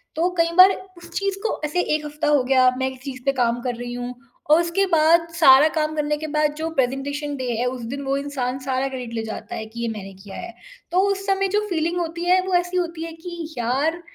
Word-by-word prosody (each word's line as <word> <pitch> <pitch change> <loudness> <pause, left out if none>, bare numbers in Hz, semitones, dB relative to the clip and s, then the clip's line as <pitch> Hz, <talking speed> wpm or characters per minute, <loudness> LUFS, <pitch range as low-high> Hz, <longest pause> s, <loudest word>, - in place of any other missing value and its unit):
तो 335 +3 +2
कई 335 0 +3
बार 370 +1 +10 0.3
उस 345 0 -11
चीज़ 395 -1 -1
को 450 - -1
ऐसे 305 +4 0
1 305 0 -3
हफ्ता 295 +1 -3
हो 295 -3 +4
गया, 255 0 +4
मैं 260 0 0
इस 260 - -12
चीज़ 265 -2 -7
पे 275 - +4
काम 240 -2 +1
कर 245 -1 -2
रही 240 +1 -6
हूँ 245 0 -5 0.4
और 315 +3 +7
उसके 345 +3 +1
बाद 330 +1 +5
सारा 270 0 +8
काम 310 0 0
करने 300 0 0
के 310 +1 -5
बाद 300 0 +1
जो 320 +1 -2
प्रेजेंटेशन 285 +3 -1
डे 255 -2 -3
है 245 - 0
उस 250 0 -3
दिन 280 - -5
वो 270 +1 0
इंसान 270 -2 -3
सारा 265 0 -1
क्रेडिट 250 -3 -6
ले 225 -1 -2
जाता 220 -1 -6
है, 220 - -5
कि 230 +2 -8
ये 235 - -1
मैंने 200 -3 -6
किया 200 -2 -10
है। 350 0 -7 0.4
तो 360 - +3
उस 390 0 -3
समय 390 0 +2
जो - - +2
फ़ीलिंग 340 0 0
होती 340 0 -3
है 370 +1 +5
वो 375 - -2
ऐसी 355 +1 +1
होती 335 -2 -2
है 330 - -7
कि 330 -1 -8
यार, 275 +8 0
295 Hz, 245 wpm, -22 LUFS, 255-335 Hz, 0.4 s, बार